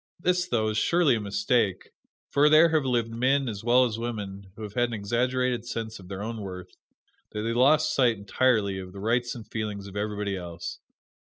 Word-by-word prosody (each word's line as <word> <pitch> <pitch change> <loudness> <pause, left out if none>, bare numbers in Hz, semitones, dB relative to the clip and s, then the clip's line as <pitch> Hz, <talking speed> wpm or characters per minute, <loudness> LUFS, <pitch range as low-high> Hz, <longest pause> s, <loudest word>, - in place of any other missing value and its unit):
This, 180 +1 +1
though, 110 -9 +1
is 110 0 0
surely 170 +1 +3
a 115 - -1
mistake, 105 - 0 0.4
for 145 +1 +5
there 155 +2 +7
have 155 -3 +1
lived 120 -3 0
men, 130 +4 +1
as 105 -3 -5
well 125 +2 +5
as 115 -2 -3
women, 100 -5 -5
who 110 - -8
had 105 - -6
such 120 +3 +1
an 120 - -7
exaggerated 120 +3 0
sense 115 -2 -5
of 95 - -13
their 100 +1 -6
own 115 0 -5
worth, 90 -2 -8 0.6
that 105 - -3
they 115 +1 -1
lost 150 +6 +4
sight, 120 -4 +3
entirely, 100 -1 +1
of 90 -1 -9
the 100 - -9
rights 120 +4 0
and 115 -3 -9
feelings 105 -3 -4
of 100 0 -10
everybody 105 -1 -2
else. 85 -2 -7
115 Hz, 205 wpm, -27 LUFS, 100-125 Hz, 0.6 s, there